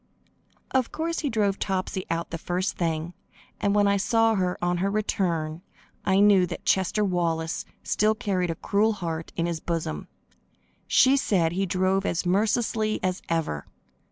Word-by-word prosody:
Of 260 -3 +1
course, 330 +1 -2
he 295 - -1
drove 205 -4 0
Topsy 190 -1 -2
out 165 +1 -2
the 165 - -4
first 185 +5 -2
thing, 165 0 -2 0.5
and 200 0 +1
when 205 -1 +4
I 200 0 +3
saw 225 +3 +3
her, 185 -3 0
on 175 0 0
her 190 +3 0
return, 175 -6 -1 0.4
I 190 0 +3
knew 200 -3 +5
that - - -7
Chester 195 +3 +2
Wallace 170 -3 -1 0.2
still 215 +1 +2
carried 195 -6 -1
a 165 - -1
cruel 210 +6 +1
heart 165 -5 -4
in 170 - 0
his 170 -2 -2
bosom. 165 -1 -3 0.8
She 265 +1 +5
said 180 -10 +2
he 190 +3 -1
drove 185 +1 +1
as 175 -2 -1
mercilessly 215 +3 +1
as 185 0 -1
ever. 160 - -1
185 Hz, 160 wpm, -26 LUFS, 170-210 Hz, 0.8 s, knew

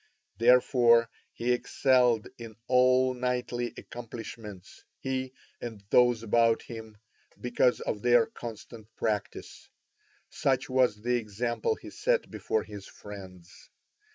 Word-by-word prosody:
Therefore 120 -1 +5 0.2
he 120 +1 -1
excelled 125 -2 +2
in 115 -2 -9
all 130 0 +4
knightly 125 -1 -2
accomplishments, 110 -4 -9
he 130 -1 -3 0.3
and 110 -4 -7
those 120 -2 +4
about 115 +1 +3
him, 110 -2 -9 0.4
because 125 0 +1
of 105 - -3
their 120 -1 +5
constant 115 -1 -9
practice. 105 -2 -4 0.6
Such 135 -1 0
was 125 -5 +2
the 125 +1 +2
example 120 - -2
he - - -11
set - - 0
before 110 - -1
his 100 -2 -10
friends. 95 -3 -12
120 Hz, 110 wpm, -29 LUFS, 110-125 Hz, 0.6 s, Therefore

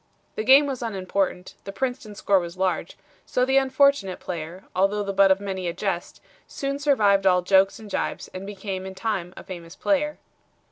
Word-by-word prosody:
The 215 - -3
game 270 +5 +7
was 270 -3 -4
unimportant, 195 -4 -2
the 195 - -6
Princeton's 220 -2 -4
score 195 -1 +3
was 175 0 -7
large, 185 -2 -1 0.3
so 250 - 0
the 265 +1 +2
unfortunate 270 -7 +3
player, 170 +2 -6
although 195 +3 +2
the 200 0 -3
butt 195 0 +5
of 190 0 +4
many 190 -2 -4
a 170 - -2
jest, 180 -1 -4 0.3
soon 275 0 -3
survived 205 -9 +3
all 180 -1 +4
jokes 195 +1 +4
and 220 - -11
jibes 200 - -3
and 185 - -6
became 195 -2 -5
in 190 - -8
time 190 -3 -2
a - - -8
famous 170 -2 -9
player." 300 0 0
195 Hz, 185 wpm, -24 LUFS, 185-240 Hz, 0.3 s, game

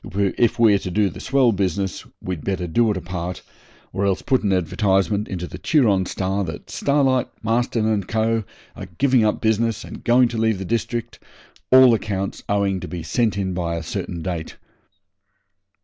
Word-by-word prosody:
If 100 +4 +1
we're 110 -4 +5
to 95 - -5
do 100 +2 +1
the - - -10
swell 135 -3 +3
business 95 -1 -2 0.2
we'd 90 -5 -4
better 95 -2 -2
do 115 +7 +2
it 105 - 0
apart, 90 0 -5 0.5
or 95 - -1
else 95 -1 0
put 130 -2 +2
an 100 - 0
advertisement 95 +3 +1
into 90 -2 -4
the 85 - -9
"Turon 105 - +2
Star" 95 +1 -1
that - - -8
Starlight, 135 -3 +1 0.2
Marston, 115 0 0
and 105 -4 0
Co. 110 0 0 0.3
are - - -8
giving 130 -4 +3
up 105 - +1
business 110 0 +1
and - - -10
going 125 +1 +4
to 115 - -4
leave 110 -2 +2
the 95 - -5
district, 115 +3 -3 0.5
all 130 -1 +8
accounts 100 -3 -2
owing 100 -2 +1
to - - -7
be 85 -3 -6
sent 105 +6 0
in 95 -2 -1
by 85 -2 -2
a 85 - -4
certain 85 +1 -5
date.' 85 -2 -4
100 Hz, 180 wpm, -22 LUFS, 95-115 Hz, 0.5 s, all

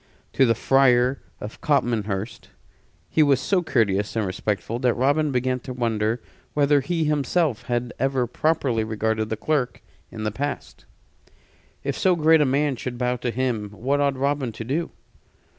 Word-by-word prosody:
To 135 - +4
the 115 - +3
Friar 130 +1 +3 0.2
of 105 - -8
Copmanhurst 110 -7 -1 0.6
he 160 - +2
was 140 -3 +4
so 190 +5 +1
courteous 105 - 0
and 110 -2 0
respectful 105 +4 -2
that 125 -2 +2
Robin 145 +4 +2
began 130 0 0
to 130 +1 -7
wonder 115 -1 -1 0.3
whether 145 -1 +4
he 165 +4 -1
himself 150 -2 0
had 120 0 -1
ever 135 -1 +1
properly 125 -3 0
regarded 110 0 -1
the 110 - -2
clerk 140 -3 -1 0.3
in 110 -2 -7
the 105 - -1
past. 140 +6 -5 1.0
If 140 -1 -2
so 185 -1 +3
great 160 -1 +5
a - - +4
man 140 0 +1
should 120 +1 -5
bow 125 0 0
to 120 - -3
him, 120 -4 -1
what 130 +8 -1
ought 140 -2 +1
Robin 140 -2 0
to 110 - -6
do? 150 +8 -2
125 Hz, 160 wpm, -24 LUFS, 115-145 Hz, 1.0 s, great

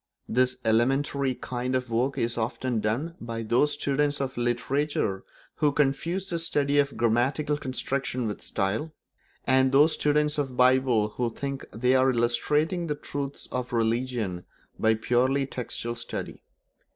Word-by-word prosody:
This 125 +2 +2
elementary 135 +4 +2
kind 125 +1 -3
of 125 -2 -2
work 125 +4 0
is 115 0 0
often 120 +1 -1
done 120 +11 -1
by 115 -1 -4
those 125 +7 +2
students 145 0 0
of 135 -1 -3
literature 120 -3 -1 0.3
who 150 -2 +3
confuse 150 +7 0
the 170 - -1
study 145 -3 +2
of 140 -1 +1
grammatical 125 +6 +1
construction 130 -2 -2
with 105 - -5
style, 110 +10 -2 0.5
and 130 0 +4
those 145 +4 +6
students 150 0 +1
of 145 - +1
the 130 - -12
Bible 125 -4 +4
who 120 +2 -2
think 140 +4 -5
they 125 +3 +1
are 130 0 +4
illustrating 150 +8 +1
the 150 - -1
truths 140 -1 -5
of 125 -1 -3
religion 115 -5 -1 0.4
by 110 0 +3
purely 130 +5 +1
textual 120 -2 -4
study. 115 0 -6
130 Hz, 145 wpm, -27 LUFS, 120-145 Hz, 0.5 s, those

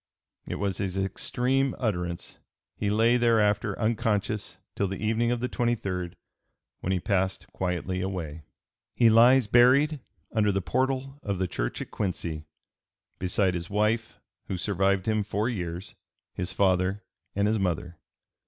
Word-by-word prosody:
It - - -3
was 100 -2 -2
his 95 -1 -2
extreme 125 +7 0
utterance. 90 -7 -3 0.4
He 105 - -1
lay 115 +3 +4
thereafter 110 -3 +2
unconscious 110 -2 -1 0.2
till 100 - 0
the 95 +1 -4
evening 110 +2 +1
of 120 -1 0
the 125 - 0
23d, 100 -9 -1 0.7
when 95 - -2
he 95 - +1
passed 95 +1 0
quietly 90 0 -2
away. 85 -5 -4 0.5
He 115 -2 +5
lies 120 +3 +6
buried 130 +7 +5 0.3
"under 105 -3 +2
the 95 - 0
portal 130 +6 -1
of 100 -2 -2
the 95 0 0
church - - -3
at - - -16
Quincy" 85 -5 -3 0.7
beside 90 +1 +1
his 85 0 -4
wife, 110 +2 0 0.3
who 95 - -2
survived 95 +1 +1
him 110 -1 +2
four 105 +2 -1
years, 90 -4 -4 0.4
his 90 0 -3
father 95 +1 +1 0.3
and 100 +1 +2
his 110 0 +1
mother. 85 -2 -2
100 Hz, 145 wpm, -27 LUFS, 90-115 Hz, 0.7 s, lies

